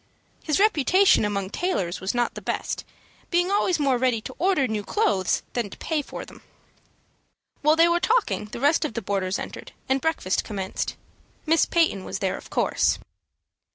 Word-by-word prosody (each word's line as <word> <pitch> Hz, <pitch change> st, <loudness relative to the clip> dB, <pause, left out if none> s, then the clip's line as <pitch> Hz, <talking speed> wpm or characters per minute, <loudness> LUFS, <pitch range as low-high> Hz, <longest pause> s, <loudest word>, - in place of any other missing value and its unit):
His 305 Hz, +2 st, +1 dB
reputation 385 Hz, -, +4 dB
among 200 Hz, -2 st, -2 dB
tailors 195 Hz, -, -2 dB
was 190 Hz, +5 st, -2 dB
not 240 Hz, 0 st, +1 dB
the -, -, -8 dB
best, -, -, -3 dB, 0.5 s
being 355 Hz, +2 st, +2 dB
always 380 Hz, -3 st, +2 dB
more 275 Hz, -5 st, +1 dB
ready 250 Hz, -3 st, +2 dB
to 260 Hz, -, -8 dB
order 360 Hz, -7 st, +2 dB
new 215 Hz, -2 st, -2 dB
clothes 350 Hz, -, +1 dB
than 235 Hz, -4 st, -2 dB
to -, -, -11 dB
pay 315 Hz, -2 st, -1 dB
for -, -, -8 dB
them. -, -, -15 dB, 1.2 s
While 305 Hz, +2 st, +4 dB
they 330 Hz, +1 st, +6 dB
were 340 Hz, 0 st, +2 dB
talking 445 Hz, -, +1 dB
the 210 Hz, -, -8 dB
rest 290 Hz, +6 st, +3 dB
of 300 Hz, -8 st, -3 dB
the 230 Hz, -, -3 dB
boarders 190 Hz, -1 st, -1 dB
entered, -, -, -8 dB
and 265 Hz, 0 st, +1 dB
breakfast 320 Hz, -, 0 dB
commenced. 195 Hz, -3 st, -4 dB, 0.5 s
Miss 325 Hz, +1 st, +4 dB
Peyton 320 Hz, -, +1 dB
was -, -, -4 dB
there, 190 Hz, -1 st, -1 dB
of -, -, -11 dB
course. -, -, +1 dB
270 Hz, 175 wpm, -25 LUFS, 205-340 Hz, 1.2 s, they